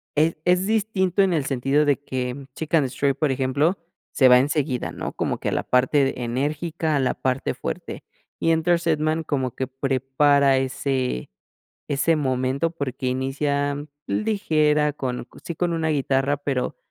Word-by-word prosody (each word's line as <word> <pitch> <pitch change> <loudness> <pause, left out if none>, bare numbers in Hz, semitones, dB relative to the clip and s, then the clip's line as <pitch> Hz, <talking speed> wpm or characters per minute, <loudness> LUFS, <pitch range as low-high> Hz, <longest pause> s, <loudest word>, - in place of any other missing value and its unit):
es 155 +2 +2
es 180 +1 +3
distinto 200 -3 +1
en 190 -2 +3
el 150 -4 0
sentido 135 +3 +1
de 145 -2 +2
que 130 +1 -4
Chick 160 0 -6
and 150 -5 +4
Stray, 140 +2 0
por 145 +2 0
ejemplo, 140 +7 +1 0.4
se 130 - +5
va 125 0 +8
enseguida, 140 -2 -1
¿no? - - -5
Como - - -2
que - - -2
a - - -3
la - - 0
parte 130 0 +1
enérgica, 150 +6 -1
a 140 - +2
la 130 -1 +1
parte 130 0 -1
fuerte. - - -6 0.4
Y 165 - +1
Enter 165 +1 +3
Sandman, 160 -1 0
como 130 -5 -2
que 130 - -3
prepara 135 +1 +2
ese 130 - -1 0.6
ese 150 +4 +2
momento 130 +2 0
porque 135 -5 -4
inicia 140 +2 -1 0.3
ligera 155 -8 +1
con, 125 -4 -4 0.2
sí, 170 - -5
con 175 +2 -1
una 165 -1 0
guitarra, 140 -1 +1
pero 135 -3 -2
145 Hz, 160 wpm, -23 LUFS, 130-160 Hz, 0.6 s, va